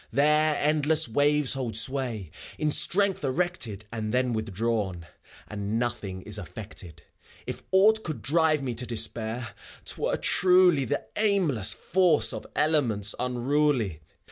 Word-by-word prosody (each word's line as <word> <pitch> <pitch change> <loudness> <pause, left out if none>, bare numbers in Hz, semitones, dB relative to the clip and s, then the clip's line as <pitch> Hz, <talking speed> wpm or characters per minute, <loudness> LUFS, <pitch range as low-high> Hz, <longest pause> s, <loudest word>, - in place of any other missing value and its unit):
There 150 +4 +3
endless 150 +1 +1
waves 145 +3 +2
hold 125 -5 -2
sway, 115 - 0 0.3
in 155 0 0
strength 195 +3 +1
erected 130 - -2
And 110 -2 -4
then 125 0 0
withdrawn, 105 -4 -2 0.2
— - - -20
^and 105 - -6 0.2
nothing 110 -6 -4
is - - -3
effected. 85 -4 -9 0.4
If - - -6
aught 215 +3 +4
could 155 -3 -6
drive 155 -1 +2
me 125 -2 -3
to 120 +2 -4
despair, 115 0 -1 0.4
't - - -1
were, - - 0
truly 180 -6 +4
The 110 - -3
aimless 175 - +2
force 160 -11 +2
of 110 - -7
elements 120 -10 +2
unruly. 125 - 0
130 Hz, 135 wpm, -26 LUFS, 110-155 Hz, 0.4 s, aught